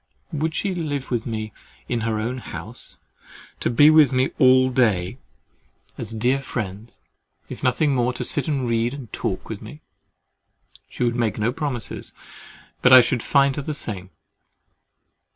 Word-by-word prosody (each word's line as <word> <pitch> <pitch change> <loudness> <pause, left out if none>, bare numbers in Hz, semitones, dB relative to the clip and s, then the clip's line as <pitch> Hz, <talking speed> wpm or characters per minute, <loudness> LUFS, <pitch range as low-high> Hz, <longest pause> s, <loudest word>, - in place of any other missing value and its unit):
"Would 155 +1 -1
she 200 -2 -1
live 145 -7 -4
with 120 -1 -1
me 110 -2 -4 0.3
in 120 - -1
her 115 -1 -1
own 120 +4 -3
house—to - - -9
be 145 +6 +6
with 155 -4 +6
me 130 0 +1
all 130 0 +5
day 110 -4 +1 0.8
as 115 -2 -6
dear 120 +5 +1
friends, 110 -4 -6 0.5
if - - -8
nothing 140 +4 +2
more, 125 -1 +1
to - - -4
sit 145 - +1
and 135 -5 -1
read 115 +2 0
and 130 -7 -10
talk 95 - -3
with 110 -3 -6
me?"—"She 100 -2 -13
would 120 -1 +1
make 115 -4 0
no 110 +2 0
promises, 135 -5 -2 0.7
but 125 - +5
I 130 0 +11
should 120 0 0
find 140 +1 +3
her - - -1
the 150 +2 -4
same." 95 -8 -3
125 Hz, 150 wpm, -22 LUFS, 110-140 Hz, 0.8 s, I